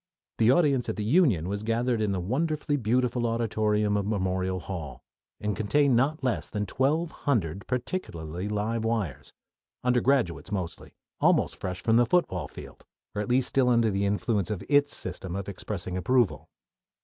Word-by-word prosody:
The 115 0 +5
audience 135 -3 +3
at - - -2
the 105 - -3
Union 115 - +3
was 100 +1 -3
gathered 115 +1 0
in 105 -2 +1
the 95 - -1
wonderfully 150 - -1
beautiful 125 0 +1
auditorium 105 -2 +1
of 100 -1 -1
Memorial 95 -2 -1
Hall, 80 -8 -7 0.4
and 105 -1 -2
contained 125 +6 +2
not 140 +5 +1
less 125 -4 -1
than 105 -1 -2
twelve 150 - 0
hundred 100 - -1
particularly 95 - -3
live 110 +2 -1
wires, 95 - -2 0.5
undergraduates 125 -7 +1
mostly, 95 -5 -5 0.2
almost - - +3
fresh 95 0 -5
from 115 0 +4
the 120 -1 +4
football 180 +6 +1
field, - - -12 0.3
or 105 - -2
at 105 - -4
least 125 +1 +2
still 130 -2 +3
under 115 -2 +3
the 100 +1 0
influence 100 -1 0
of 100 -3 -3
its 145 0 +3
system 90 0 -4
of 100 -1 -4
expressing 95 -2 -5
approval. 100 -3 +1
110 Hz, 160 wpm, -27 LUFS, 95-125 Hz, 0.5 s, The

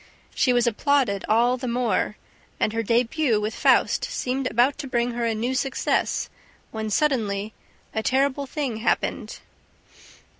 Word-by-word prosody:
She 255 - +2
was 245 -1 +3
applauded 235 -3 +1
all 240 +3 +3
the 255 0 -5
more; 235 -3 0 0.4
and 215 - +1
her 230 - 0
debut 235 +2 +1
with 210 +1 -2
Faust - - +3
seemed 255 +1 -2
about 245 +5 +2
to 275 - -5
bring 240 -1 0
her 235 0 -2
a 225 - 0
new 240 +4 -1
success, 265 0 0 0.4
when 220 -1 -4
suddenly... 215 -5 0 0.4
a 220 - -1
terrible 275 +3 +1
thing 270 -5 -3
happened. 220 - -2
240 Hz, 145 wpm, -24 LUFS, 220-265 Hz, 0.4 s, was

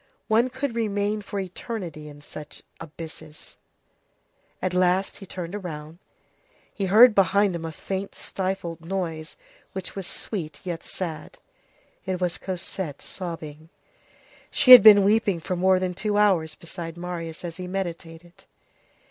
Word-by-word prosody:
One 230 +3 +3
could 260 0 -3
remain 210 -1 -1
for 200 0 -5
eternity 180 -5 -6
in 145 0 -13
such 150 0 -10 0.2
abysses. 160 -1 -10 1.0
At 185 -1 -2
last 185 +1 +2
he 195 - -11
turned 185 +2 -6
round. 155 -1 -7 0.7
He 200 - -2
heard 220 +5 +8
behind 200 0 +3
him 165 -1 -4
a 160 - -4
faint 190 +4 -5
stifled 185 -3 -4
noise, 165 -3 -4 0.4
which 190 -1 -6
was 195 -2 -4
sweet 170 -8 -4
yet 175 -3 -4
sad. 165 -5 -6 0.7
It 185 -1 -3
was 175 -4 -1
Cosette 180 -4 -5
sobbing. 160 -3 -7 0.8
She 255 - +4
had 250 -2 +14
been 205 -1 +9
weeping 205 -3 +2
for 180 +3 -3
more 185 +1 +4
than 185 -1 -1
two 205 +3 -1
hours 185 -7 +3
beside 170 0 -8
Marius 175 -1 -6
as 165 -1 -6
he 180 -1 -6
meditated. 175 -2 -6
180 Hz, 140 wpm, -25 LUFS, 165-200 Hz, 1.0 s, had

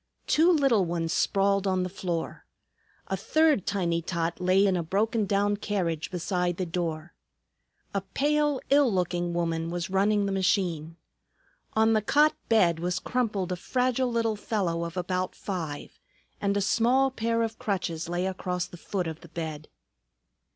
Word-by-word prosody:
Two 330 +4 +4
little 275 - +3
ones 165 -2 -2
sprawled 200 0 +2
on 185 -1 +1
the - - -1
floor. 175 -3 -4 0.6
A 195 - -2
third 300 - +2
tiny 175 -4 0
tot 170 0 -2
lay 185 +2 +4
in 190 -2 +2
a 175 - 0
broken 205 +5 0
down 205 +1 +1
carriage 170 -7 -2
beside 180 -1 -1
the 185 - -1
door. 165 -2 -3 0.8
A 200 - 0
pale, 290 +8 +1
ill 280 -3 +5
looking 175 -2 -1
woman 165 -1 -1
was 175 +1 -4
running 200 +2 +2
the 200 - -1
machine. 180 -4 0 0.8
On 220 +1 +4
the 215 - +3
cot 295 +8 +4 0.2
bed 175 -8 +4
was 180 +2 -1
crumpled 210 -5 -1
a - - 0
fragile 250 +5 0
little 230 -2 +1
fellow 185 -6 -1
of 170 +2 -7
about 185 0 -2
five, 165 -7 -5 0.4
and 200 0 +1
a - - +1
small 250 +6 +3
pair 230 -2 0
of 225 -1 -4
crutches 170 -5 -2
lay 175 +1 -1
across 180 -2 -2
the 175 - -12
foot 185 +1 -3
of 160 -1 -6
the 170 - -13
bed. 155 -2 -5
190 Hz, 160 wpm, -27 LUFS, 170-220 Hz, 0.8 s, ill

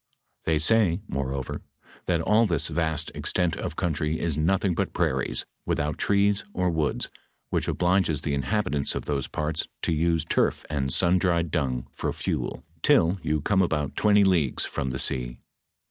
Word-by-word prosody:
They 80 -1 +2
say, 90 +1 +4
moreover, 70 -1 -3 0.5
that 85 -2 +1
all 110 +6 +3
this 85 -6 +3
vast 80 -2 -1
extent 90 -2 0
of 75 - -5
country 80 -3 -1
is 85 -4 0
nothing 90 +4 +1
but - - -2
prairies, - - 0 0.2
without 75 0 -1
trees 100 0 +2
or 90 -1 +1
woods, 80 -3 -1 0.4
which - - 0
obliges 90 -4 +1
the 75 - -2
inhabitants 70 +2 0
of - - -4
those 70 -2 -2
parts 75 +1 -2 0.2
to 85 - +1
use 80 0 +1
turf - - +1
and 70 -3 -1
sun 90 +6 +3
dried 85 -3 +1
dung 65 -7 -1
for - - -2
fuel, - - -3 0.2
till 85 +4 +3
you 75 -2 0
come 95 +5 +2
about 75 -5 -1
twenty 105 -1 +4
leagues 85 -9 +2
from 70 - -3
the 65 - -3
sea. - - -2
80 Hz, 160 wpm, -26 LUFS, 75-90 Hz, 0.5 s, say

